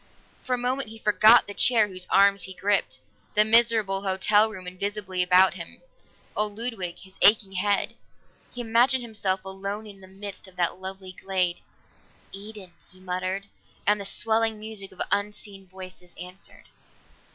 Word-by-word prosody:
For 255 - -1
a - - -5
moment 250 0 -2
he 225 - -10
forgot 215 +2 +5
the 205 - -7
chair 225 -1 +5
whose 185 -2 -5
arms 200 0 +4
he 190 +1 -7
gripped, 200 +1 0 0.3
the 210 0 +5
miserable 220 -3 +4
hotel 205 +3 +2
room 190 -4 -10
invisibly 190 0 -3
about 180 +1 +5
him, 170 -2 -10 0.6
old 210 -1 0
Ludwig, 225 -7 -1
his 190 0 -16
aching 205 -2 +5
head. 200 +2 0 0.6
He 245 - -6
imagined 245 +3 +2
himself 195 -4 -2
alone 195 +3 -5
in 200 -2 -13
the 190 - -14
midst 195 +1 -8
of 185 - -17
that 180 +1 -1
lovely 190 0 -7
glade. 185 -2 -1 0.7
"Eden!" 200 -2 -10 0.2
he 185 - -21
muttered, 185 +1 -4 0.4
and 210 0 +2
the - - -6
swelling 225 +2 0
music 210 -2 -7
of 185 - -17
unseen 205 -1 -4
voices 185 -1 -12
answered. 180 +2 -9
200 Hz, 155 wpm, -25 LUFS, 185-215 Hz, 0.7 s, forgot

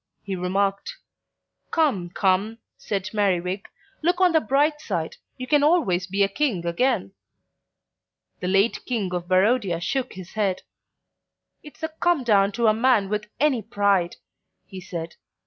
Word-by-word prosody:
he 195 -1 -4
remarked. 195 - -1 0.7
"Come, 265 - +1
come," 195 +4 +1 0.2
said 200 -1 -4
Merriwig, 190 -2 0 0.4
"look 350 +3 +1
on 365 -1 +5
the 320 -1 +3
bright 290 +6 +1
side; 170 - -3 0.2
you 255 - -5
can 295 +2 +3
always 285 - +2
be 200 +1 +1
a - - +3
King 200 - -1
again." 195 +3 0 1.3
The 180 - -3
late 195 +4 +2
King 210 -8 -2
of 175 -1 -3
Barodia 190 -1 +2
shook 255 +8 -2
his 185 -1 -10
head. 200 -4 -1 1.0
"It's 300 +2 -15
a 320 - -1
come 320 -2 0
down 200 -4 +3
to 235 +2 0
a 215 - +5
man 225 -3 +2
with 210 0 -3
any 275 -5 +2
pride," 200 -4 +1 0.5
he 190 -1 -9
said. 170 -3 -7
205 Hz, 145 wpm, -24 LUFS, 185-260 Hz, 1.3 s, on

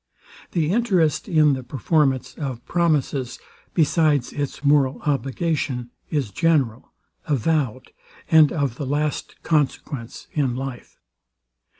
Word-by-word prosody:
The 165 -2 +1
interest 190 -9 +1
in 155 -4 +4
the 130 - -3
performance 135 +1 0
of 130 -5 -5
promises, 145 -7 0 0.4
besides 155 -4 +2
its 145 0 -4
moral 140 -2 +3
obligation, 135 -3 -1 0.2
is 140 -9 -1
general, 130 - +1 0.4
avowed, 140 -3 0 0.4
and 160 -2 +6
of 140 -7 -1
the 140 - -4
last 150 +2 -2
consequence 140 -5 -1
in 135 -5 0
life. 130 -1 -7
145 Hz, 105 wpm, -23 LUFS, 130-155 Hz, 0.4 s, and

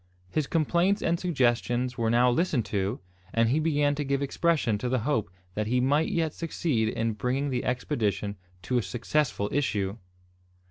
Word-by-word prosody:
His 155 -3 0
complaints 175 +5 +2
and 170 0 +1
suggestions 125 -5 +1
were 115 -2 0
now 120 +2 +4
listened 135 - +1
to, 100 +3 -1 0.4
and 115 0 +3
he 140 +6 +2
began 145 -2 +2
to 145 +1 -2
give 140 0 0
expression 140 -7 +1
to 125 - -2
the 130 - +2
hope 115 -7 0 0.2
that 105 +2 -2
he 125 +3 +2
might 145 +5 +2
yet 160 -2 0
succeed 150 -9 -1
in 115 0 -1
bringing 130 +6 -1
the 125 - -1
expedition 105 -6 -1 0.3
to 125 +5 +1
a - - 0
successful 120 +2 -1
issue! 105 -7 -1
125 Hz, 170 wpm, -27 LUFS, 115-150 Hz, 0.4 s, now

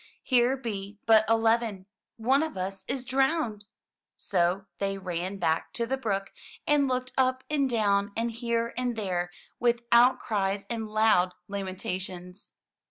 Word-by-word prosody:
"Here 250 +1 +3
be 205 -5 -5
but 220 -1 +6
eleven. 225 -3 +2 0.3
One 260 +5 +3
of 315 -9 -3
us 190 +1 -4
is 260 -2 -2
drowned!" 265 -5 0 0.5
So 185 0 0
they 195 0 -1
ran 185 +1 -4
back 165 -3 0
to 235 - -1
the 260 +3 -1
brook, 200 -7 -2 0.3
and 290 -2 +3
looked 255 0 -2
up 260 0 +2
and 280 -3 +2
down, 205 -3 +2
and 230 +1 0
here 235 0 -1
and 245 -1 -1
there 180 -5 -2 0.3
with 235 0 +2
outcries 210 -5 +3
and 225 -2 -3
loud 215 -4 +3
lamentations. 185 -1 -5
220 Hz, 140 wpm, -28 LUFS, 195-245 Hz, 0.5 s, but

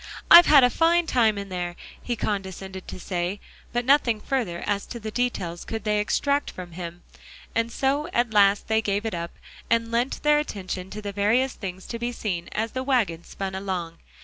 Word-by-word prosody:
"I've 345 0 +11
had 285 -3 +8
a 250 - +5
fine 340 +1 +3
time 225 -8 +2
in 200 0 -5
there," 175 -1 -4 0.3
he 240 - -2
condescended 190 -3 -4
to - - -7
say, 180 +2 -3 0.3
but 240 0 -1
nothing 255 -5 +3
further 210 -9 -2
as 200 -1 -1
to 235 - -7
the 215 -1 -6
details 190 -9 -2
could 225 -2 -5
they 210 -1 +1
extract 280 +7 0
from 180 -1 -9
him; 175 0 -8 0.5
and 230 +1 0
so 280 +5 0
at 240 -5 0
last 200 -1 +4
they 220 0 +2
gave 205 0 -1
it 225 - -2
up, 170 0 -5 0.3
and 230 0 +1
lent 240 +3 -1
their 300 0 +5
attention 190 -8 -5
to 210 +1 -7
the 205 - -3
various 220 +7 +2
things 190 -1 -7
to 230 - -5
be 240 +1 -2
seen 185 -7 -4
as 225 +1 -1
the 260 - -3
wagon 230 -11 0
spun 195 -1 -5
along. 185 -4 -4
210 Hz, 200 wpm, -25 LUFS, 190-245 Hz, 0.5 s, I've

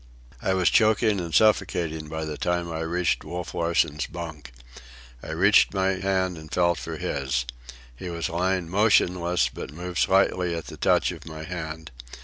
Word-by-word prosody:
I 95 - +1
was 90 -4 +3
choking 110 -2 +3
and 85 -1 -5
suffocating 80 -5 +2
by 80 0 -4
the 75 -1 -4
time 85 +1 -1
I 80 - -4
reached 85 +1 0
Wolf 90 +3 -6
Larsen's 85 -3 0
bunk. 80 -6 -8 0.7
I - - -9
reached - - +4
my 95 0 +2
hand 95 -2 0
and 80 -1 -13
felt 85 -1 +2
for - - -6
his. 65 -3 -2 0.5
He 90 +9 -7
was 85 -1 -3
lying 90 +1 -1
motionless, 90 - +2
but - - -8
moved 90 +3 -5
slightly 90 -2 +2
at 85 - -5
the - - -9
touch - - +2
of - - -10
my 80 0 -7
hand. 80 -2 -6
85 Hz, 165 wpm, -25 LUFS, 80-90 Hz, 0.7 s, reached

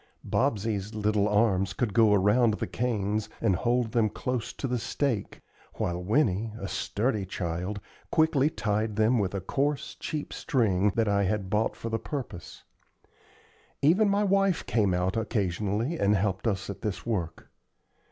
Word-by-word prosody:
Bobsey's 110 -4 -1
little 105 -1 +1
arms 100 -3 +2
could 105 0 -1
go 110 -1 +5
around 105 +3 +4
the - - -3
canes 110 -3 -1
and 100 -5 +2
hold 120 +3 0
them 115 -3 +2
close 125 +2 -3
to - - -6
the 125 -1 -1
stake, 120 -3 -2 0.3
while 85 0 -2
Winnie, 110 -1 +1
a 100 - -4
sturdy 105 +1 -1
child, 90 +2 -3 0.3
quickly 155 -3 +3
tied 110 -5 -1
them 110 +3 +3
with 100 -1 -1
a 95 - -2
coarse, 140 +9 -1
cheap 150 -2 -4
string 105 -7 +1
that 115 -1 +2
I 100 -1 +2
had 100 -1 -2
bought 110 +1 +1
for 115 - -5
the 115 0 -1
purpose. 130 - -7 1.2
Even 190 +8 +5
my 200 +1 +2
wife 195 -2 +2
came 100 -6 +2
out 90 +1 0
occasionally 105 - -1
and 100 +1 +3
helped 100 +2 0
us 100 -3 -1
at 100 - -7
this 95 -5 -4
work. 90 -8 -3
110 Hz, 155 wpm, -28 LUFS, 100-125 Hz, 1.2 s, go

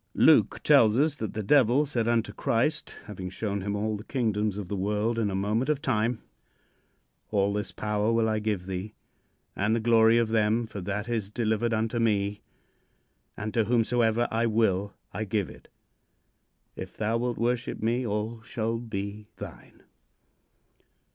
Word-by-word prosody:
Luke - - +4
tells 110 0 +5
us 145 +1 +2
that 110 -3 -5
the 110 - -2
Devil 135 +4 +4
said 120 -5 -1
unto 115 -3 +1
Christ, 130 +9 0
having 95 -3 -6
shown 100 +1 -3
him 100 +2 -2
all 105 +1 -1
the 105 - -9
kingdoms 110 -5 -1
of 100 -3 -5
the 100 - -3
world 105 +4 0
in 105 -3 +1
a 95 - -3
moment 105 +7 0
of 150 -2 +1
time: 120 -5 0 1.1
"All 100 -1 +1
this 105 -1 -3
power 105 +1 -1
will 115 -1 +2
I 110 -1 0
give 105 -4 -2
thee 95 +3 -5 0.6
and 105 +3 +1
the - - +1
glory 115 0 +5
of 115 -2 +2
them, 110 +1 +2
for 105 -3 -7
that 100 +4 -3
is 115 -4 -2
delivered 110 +1 0
unto 115 +1 0
me, 105 -3 0 1.0
and 110 0 -4
to 115 -2 +2
whomsoever 120 0 +2
I 115 +1 +1
will 105 -3 +1 0.2
I 110 - -2
give 105 -2 -1
it. - - -16 1.1
If - - -8
thou 110 +2 0
wilt 120 0 -2
worship 120 +1 -1
me, 120 +3 0
all 110 +1 -3
shall 115 0 -2
be 105 -2 -5
thine." - - -11
110 Hz, 165 wpm, -27 LUFS, 105-115 Hz, 1.1 s, tells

